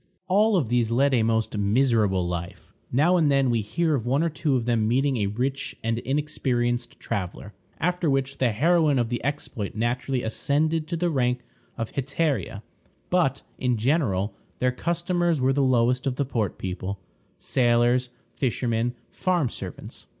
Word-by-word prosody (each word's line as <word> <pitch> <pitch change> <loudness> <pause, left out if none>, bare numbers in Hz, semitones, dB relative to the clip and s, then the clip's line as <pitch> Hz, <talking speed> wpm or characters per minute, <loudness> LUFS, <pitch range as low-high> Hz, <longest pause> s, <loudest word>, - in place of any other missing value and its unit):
All 205 +2 +4
of 135 -11 0
these 120 -2 +2
led 135 +4 +2
a 120 - +4
most 110 0 0
miserable 105 -3 +2
life. 85 0 -6 0.2
Now 160 +8 +4
and 155 -4 +3
then 135 -2 +3
we 115 -2 +1
hear 160 +10 0
of 130 -6 0
one 135 +5 +2
or 170 - +1
two 150 -2 0
of 120 -3 0
them 115 -3 +1
meeting 135 +3 +2
a 105 -3 0
rich 130 +7 -2
and 115 +1 0
inexperienced 125 -4 -1
traveler, 100 -1 -4 0.3
after 175 0 0
which 135 0 -1
the 125 -3 +3
heroine 155 +4 +3
of 120 -2 +1
the 120 -1 -3
exploit 130 -7 -3
naturally 120 +3 -1
ascended 155 +7 0
to 170 +1 -2
the 175 +1 0
rank 125 -3 +1 0.4
of 115 -2 -3
hetaira; 140 -5 -1 0.5
but, 165 -7 +2 0.2
in 125 -2 +1
general, 110 - +1 0.2
their 125 0 +1
customers 170 +3 0
were 130 +1 +2
the 140 - +1
lowest 125 0 +2
of 130 - 0
the 140 - 0
port 115 -7 -2
people 95 +1 -4 0.4
sailors, 120 0 +2 0.2
fishermen, 120 -1 -1 0.2
farm 175 -8 0
servants. - - -8
125 Hz, 165 wpm, -25 LUFS, 115-145 Hz, 0.5 s, All